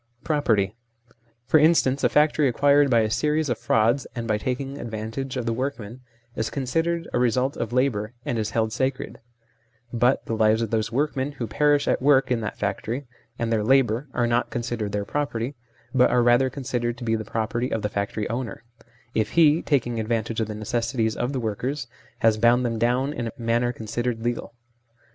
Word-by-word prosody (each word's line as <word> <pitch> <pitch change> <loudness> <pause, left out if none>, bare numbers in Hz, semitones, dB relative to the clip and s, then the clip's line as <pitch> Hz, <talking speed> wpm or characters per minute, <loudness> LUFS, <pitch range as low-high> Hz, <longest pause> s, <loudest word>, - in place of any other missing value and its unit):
Property: 110 -10 +1 0.7
for 155 - +4
instance 150 -4 +3
a - - +4
factory, 150 -1 +3
acquired 140 +3 +4
by 120 -3 +4
a 110 - 0
series 150 +3 +1
of 120 - -1
frauds 115 +5 +2
and 120 -1 -4
by 105 -1 +1
taking 135 +4 -3
advantage 115 +4 -5
of 125 - -2
the 115 - 0
workmen, 125 -2 -4 0.3
is 110 0 -1
considered 165 +5 -1
a - - +2
result 125 +3 +1
of - - -3
labour, 120 -4 0
and 120 - -1
is 110 -1 -1
held 110 -1 0
sacred; 130 +1 -2 0.7
but 120 +2 +2
the - - -3
lives 110 +1 +3
of 110 - -4
those 110 -1 0
workmen 140 +1 -1
who 125 -4 -4
perish 145 +6 +2
at - - +1
work 135 -1 +4
in 120 -2 +1
that 105 - -4
factory, 110 +6 -3 0.3
and 115 -1 -1
their 110 -2 +1
labour, 130 +1 +2
are 120 - 0
not 120 +1 +1
considered 115 -3 -3
their 100 0 -2
property, 135 -1 -2 0.4
but 125 -1 +5
are 125 -1 +3
rather 120 +2 +4
considered 120 -3 -3
to 125 - -8
be 115 -1 0
the 110 - -3
property 115 +3 -2
of 110 - -2
the - - +1
factory 100 +1 -3
owner, 115 -1 -4 0.5
if 110 - -1
he 160 -1 +5
taking 120 -5 0
advantage 115 0 -1
of 110 - -1
the 105 - -5
necessities 115 +1 -1
of 125 - -2
the 135 - -2
workers 125 +5 -3 0.4
has 110 -1 +3
bound 120 +2 +4
them 115 -2 -1
down 125 +5 +1
in 120 -5 -3
a - - -4
manner 120 +1 +1
considered 115 +1 -3
legal. 120 0 -3
120 Hz, 190 wpm, -24 LUFS, 110-135 Hz, 0.7 s, but